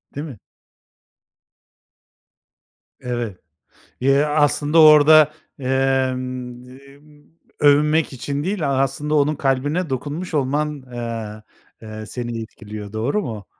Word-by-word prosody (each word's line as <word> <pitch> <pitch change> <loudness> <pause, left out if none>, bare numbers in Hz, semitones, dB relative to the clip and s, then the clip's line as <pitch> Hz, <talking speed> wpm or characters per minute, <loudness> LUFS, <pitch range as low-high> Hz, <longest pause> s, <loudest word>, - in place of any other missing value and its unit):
Değil 145 - -4
mi? 130 -7 -10 2.6
Evet, 120 -6 -4 0.6
ya, 140 +3 +2
aslında 150 +1 +3
orada, 155 0 +7 0.3
emm, 130 -2 -2
emm, 145 +2 -20 0.3
övünmek 150 +1 +3
için 140 +3 -4
değil, 185 -6 -1
a 135 -1 +1
aslında 145 +3 -2
onun 150 +1 +2
kalbine 145 +5 -1
dokunmuş 150 +7 -4
olman, 145 +1 -1
eee, 115 -3 -6 0.4
eee, 110 -1 -8
seni 120 -1 -5
etkiliyor, 105 -2 -9
doğru 120 - -1
mu? 110 -7 -7
135 Hz, 100 wpm, -21 LUFS, 120-150 Hz, 2.6 s, orada